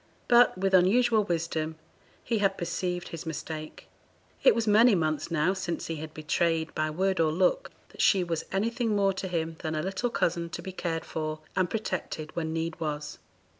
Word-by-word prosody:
But, 240 -4 +5
with 195 +1 0
unusual 215 +4 +4
wisdom, 160 -3 -2 0.5
he 230 -2 0
had 195 -1 +2
perceived 175 0 -3
his 165 0 -7
mistake; 155 0 -6 0.6
it - - +7
was 230 -1 0
many 215 +1 +6
months 155 -2 -1
now 170 +2 +2
since 185 -3 -3
he 165 - -4
had 155 +1 -7
betrayed, 160 +1 0
by 155 0 0
word 190 +4 0
or 160 -1 +3
look, 180 +3 +1 0.2
that - - -6
she 190 -3 +4
was 165 -2 -2
anything 225 +3 0
more 195 -1 +3
to 190 0 -4
him 165 -2 -2
than 155 0 -3
a 155 - -1
little 195 +6 -1
cousin 170 -6 0
to - - -6
be 190 - -5
cared 165 -3 -3
for 155 0 -4
and 185 -2 +1
protected 185 -7 -4
when 160 -2 -2
need 165 0 -3
was. 150 -2 -4
170 Hz, 185 wpm, -28 LUFS, 160-195 Hz, 0.6 s, it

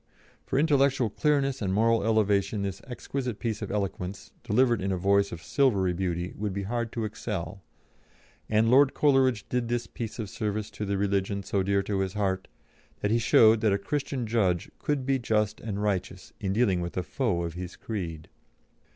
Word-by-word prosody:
For - - 0
intellectual 140 -6 +3
clearness 140 -2 +1
and 95 -3 0
moral 115 +3 +3
elevation 105 -2 +2
this 100 -2 -4
exquisite 125 -2 -4
piece 110 -2 -3
of - - -4
eloquence, 100 -2 -4
delivered 120 0 +2
in 95 +1 -1
a 95 - 0
voice 100 +2 +2
of 80 -1 -7
silvery 100 -5 +2
beauty, 90 0 -2
would 105 -1 -2
be 100 +1 -3
hard 115 +2 -2
to 115 -2 -2
excel, 100 -3 -5 0.9
and 110 +1 +3
Lord 135 +1 +5
Coleridge 130 -7 +3
did 125 -1 -1
this 120 0 -1
piece 115 -2 -6
of 110 -3 -4
service 105 +1 -3
to 105 0 -5
the 100 0 -1
religion 100 0 0
so 100 0 0
dear 100 +1 +1
to 100 -1 -2
his 95 -1 -1
heart, 95 -2 -1 0.5
that 105 - 0
he 115 - +3
showed 110 -1 +5
that 110 -3 +3
a - - +2
Christian 135 +3 -3
judge 100 -7 0
could 145 -3 -1
be 135 0 +1
just 110 -3 0
and 105 -2 -3
righteous 95 -2 -2
in 95 -2 -2
dealing 100 -4 +2
with 85 +1 -5
a 90 - 0
foe 100 - -1
of 85 -1 -4
his 90 0 -7
creed. 85 -8 -5
105 Hz, 185 wpm, -27 LUFS, 95-120 Hz, 0.9 s, Lord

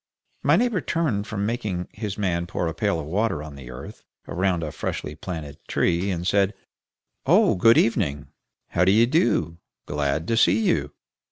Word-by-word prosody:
My 145 +3 +4
neighbor 225 -2 +1
turned 130 -12 -1
from 100 -2 -2
making 105 -6 -2
his 105 -1 -5
man 85 -4 -1
pour 90 - -2
a 80 - -2
pail 100 0 0
of 75 - -5
water 95 -1 -1
on 75 -1 -9
the 65 -3 -10
earth 65 +2 -10 0.2
round 90 -1 0
a 75 - -4
freshly 75 - -4
planted 75 -3 -7
tree, 90 +3 +1
and 90 -2 -2
said, 100 +1 +2 0.7
"Oh, - - +5
good 115 +6 +5
evening! 80 -11 +1 0.4
How 90 - +2
d'ye 105 +5 +5
do? 120 - +1 0.3
Glad 75 +2 -1
to 115 - +2
see 110 - +4
you!" 75 -9 +1
95 Hz, 170 wpm, -24 LUFS, 80-110 Hz, 0.7 s, Oh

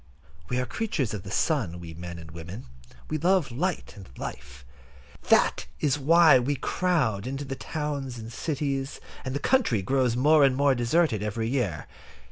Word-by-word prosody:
We 125 - 0
are 125 - -1
creatures 155 - -2
of 105 - -4
the 95 - -10
sun, 105 - 0
we 85 -1 -8
men 85 +1 -7
and 80 -1 -10
women. 85 +7 -8 0.4
We 155 - -2
love 175 -4 +2
light 175 +8 -2
and 100 -2 -12
life. 65 -2 -8 0.6
That - - +3
is 145 -1 +1
why 160 0 +6
we 140 +4 0
crowd 130 - 0
into 135 +2 -4
the 135 0 -4
towns 140 -4 -4
and 115 +1 -8
cities, 140 -2 -2 0.2
and 130 +1 -4
the - - 0
country 145 - +2
grows 130 +1 +1
more 150 +3 +5
and 135 -2 +4
more 140 0 +3
deserted 120 - +1
every 110 +2 -2
year. 115 - -1
130 Hz, 170 wpm, -27 LUFS, 105-150 Hz, 0.6 s, why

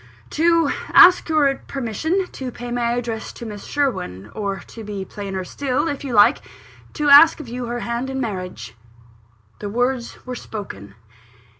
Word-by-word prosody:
"To 330 -1 +3 0.2
ask 360 -2 +7
your 295 -3 +3
permission 280 - -2
to 260 -2 -6
pay 245 0 -8
my 240 -1 0
addresses 235 -2 -4
to 235 - -9
Miss 210 -2 -8
Sherwin 105 - -2
or, 200 -2 -3
to 225 - -10
be 200 -2 -5
plainer 195 -1 -5
still, 275 - -2
if 285 -3 -4
you 265 -3 -4
like, 225 +5 +5 0.5
to 300 -2 0
ask 305 +4 +8
of 300 - -8
you 245 +1 -5
her 240 +1 -4
hand 235 +2 -3
in 265 0 -3
marriage." 185 - -5 0.9
The 205 - -5
words 245 +2 -1
were 255 - -5
spoken. 200 - -8
240 Hz, 160 wpm, -21 LUFS, 205-280 Hz, 0.9 s, ask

